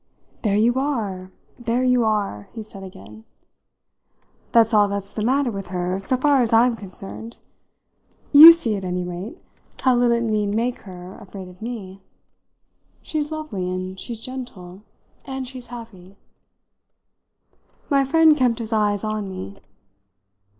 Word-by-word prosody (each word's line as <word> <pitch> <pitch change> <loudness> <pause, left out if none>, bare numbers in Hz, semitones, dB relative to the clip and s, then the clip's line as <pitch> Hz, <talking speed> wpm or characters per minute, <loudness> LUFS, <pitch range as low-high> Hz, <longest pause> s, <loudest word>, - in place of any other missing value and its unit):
"There 205 -3 +1
you 230 +3 +3
are, 210 -10 -3 0.3
there 240 +1 0
you 250 -1 +3
are!" 205 - -1
he 225 -1 -6
said 210 -2 -12
again. 110 - -12 1.3
"That's 225 -1 +4
all 210 -1 +5
that's 200 0 -5
the 215 - -3
matter 260 +2 +1
with 195 -2 -6
her 180 +1 -2
so 255 +6 0
far 280 0 +3
as 235 - 0
I'm 235 +1 +4
concerned. 205 +3 -8 0.9
You 310 +3 +12
see, 255 -11 +1
at 195 - -5
any 180 0 -2
rate, 180 - -6 0.4
how 255 -2 +3
little 240 -1 +3
it 235 - -1
need 215 -2 0
make 240 +2 -1
her 180 0 -10
afraid 190 -2 -10
of 180 +2 -17
me. 200 -5 -7 1.0
She's 300 -1 -3
lovely 245 -13 -4
and 185 +1 -5
she's 235 -2 -6
gentle 225 -8 -8 0.4
and 265 -1 -5
she's 255 -1 -6
happy." 220 -6 -11 1.7
My 275 -2 +3
friend 315 +3 +5
kept 250 -5 +1
his 225 -1 -5
eyes 210 -2 +1
on 215 -2 -3
me. 100 - -8
220 Hz, 145 wpm, -22 LUFS, 190-250 Hz, 1.7 s, You